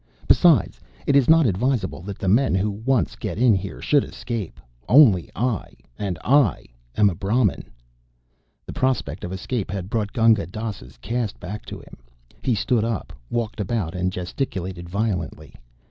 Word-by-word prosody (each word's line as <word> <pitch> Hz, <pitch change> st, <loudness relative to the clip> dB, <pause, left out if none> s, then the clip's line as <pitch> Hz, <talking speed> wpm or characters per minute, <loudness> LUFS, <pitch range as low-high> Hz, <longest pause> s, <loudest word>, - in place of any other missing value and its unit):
Besides, 155 Hz, -, +4 dB, 0.3 s
it 140 Hz, -, +2 dB
is 135 Hz, -4 st, +4 dB
not 160 Hz, -1 st, +6 dB
advisable 110 Hz, -2 st, 0 dB
that 95 Hz, +2 st, -7 dB
the 95 Hz, -, -4 dB
men 115 Hz, +2 st, +3 dB
who 100 Hz, +2 st, +1 dB
once 115 Hz, +4 st, 0 dB
get -, -, -5 dB
in 120 Hz, -1 st, +5 dB
here 95 Hz, 0 st, -3 dB
should 145 Hz, -2 st, +3 dB
escape. 115 Hz, -7 st, -6 dB, 0.3 s
Only 115 Hz, -, +6 dB
I, 120 Hz, -3 st, -2 dB, 0.2 s
and 95 Hz, 0 st, -3 dB
I 135 Hz, -6 st, +3 dB, 0.3 s
am 105 Hz, -, +5 dB
a 100 Hz, -, +1 dB
Brahmin." 100 Hz, +4 st, 0 dB, 1.0 s
The -, -, -7 dB
prospect 130 Hz, -, -1 dB
of 90 Hz, -, -5 dB
escape 100 Hz, +3 st, -3 dB
had 95 Hz, 0 st, -5 dB
brought 105 Hz, -3 st, -1 dB
Gunga 115 Hz, -7 st, +3 dB
Dass's 100 Hz, -, -7 dB
caste 115 Hz, -, -3 dB
back 105 Hz, +4 st, -7 dB
to -, -, -6 dB
him. -, -, -14 dB, 0.4 s
He 125 Hz, -, +1 dB
stood 110 Hz, +2 st, +1 dB
up, 115 Hz, -3 st, -3 dB, 0.2 s
walked 115 Hz, -3 st, -3 dB
about 100 Hz, -4 st, -2 dB
and 90 Hz, 0 st, -1 dB
gesticulated 90 Hz, -2 st, -4 dB
violently. 90 Hz, -7 st, -3 dB
105 Hz, 160 wpm, -23 LUFS, 95-120 Hz, 1.0 s, not